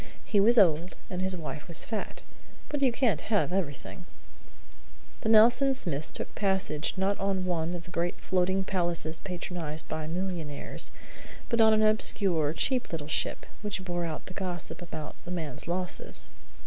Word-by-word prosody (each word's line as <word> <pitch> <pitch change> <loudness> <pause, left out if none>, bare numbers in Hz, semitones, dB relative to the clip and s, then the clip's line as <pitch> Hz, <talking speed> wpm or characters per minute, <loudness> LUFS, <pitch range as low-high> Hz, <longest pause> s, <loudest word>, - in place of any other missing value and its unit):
He 205 - +2
was 235 +5 +5
old, 170 -3 +4 0.2
and 180 0 -2
his 190 -1 +1
wife 155 -2 -6
was 170 - +2
fat; 225 - -4 0.5
but 290 -1 -2
you 265 -3 +4
can't 235 -2 +1
have 205 -5 +2
everything. 175 0 -4 1.1
The 220 - -1
Nelson 240 +5 +6
Smiths 155 - -3
took - - -7
passage 190 -6 0
not 195 +1 0
on 195 -1 0
one 175 -1 -1
of 170 - -6
the 175 - -12
great 175 0 -1
floating 185 +1 +1
palaces 170 -4 -1
patronized 175 -4 -5
by 155 -1 -4
millionaires, 170 -4 -2 0.6
but 235 -2 +3
on 220 0 +7
an 215 0 +4
obscure, 195 -7 +5
cheap 255 +8 0
little 155 -3 -4
ship, 155 - -1 0.2
which 205 -3 -4
bore 175 -1 -2
out 160 -2 -4
the 185 - -9
gossip 180 -2 -3
about 160 -3 -6
the - - -9
man's 160 -7 -4
losses. 180 +1 -1
180 Hz, 160 wpm, -29 LUFS, 165-200 Hz, 1.1 s, on